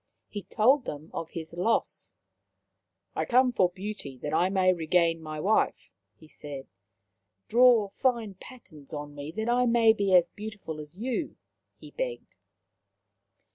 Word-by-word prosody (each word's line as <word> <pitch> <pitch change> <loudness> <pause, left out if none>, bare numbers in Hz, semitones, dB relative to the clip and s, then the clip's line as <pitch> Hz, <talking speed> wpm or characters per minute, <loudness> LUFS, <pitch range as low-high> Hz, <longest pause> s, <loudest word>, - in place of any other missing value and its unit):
He 205 - -5
told 250 +8 +3
them 150 +2 -7
of 165 - -5
his 160 -1 -6
loss. 185 +7 -1 0.5
" - - -52
I - - 0
come 255 +1 +4
for 185 -6 +3
beauty, 185 -7 -7
that 150 - -3
I 180 +3 +3
may 185 -1 +3
regain 165 0 +1
my 155 -1 -6
wife," 210 +7 +1 0.2
he 155 - -17
said. 145 -3 -9 0.4
" 100 0 -53
Draw 235 -3 +5
fine 235 -2 0
patterns 180 - -12
on 145 0 -6
me, 145 +1 -7
that 220 +4 -3
I 245 +1 +3
may 230 -1 +5
be 200 -3 +2
as 175 -1 +5
beautiful 205 -7 -7
as 150 +3 -11
you," 255 +7 -3 0.4
he - - -13
begged. - - -5
190 Hz, 155 wpm, -28 LUFS, 155-230 Hz, 0.5 s, Draw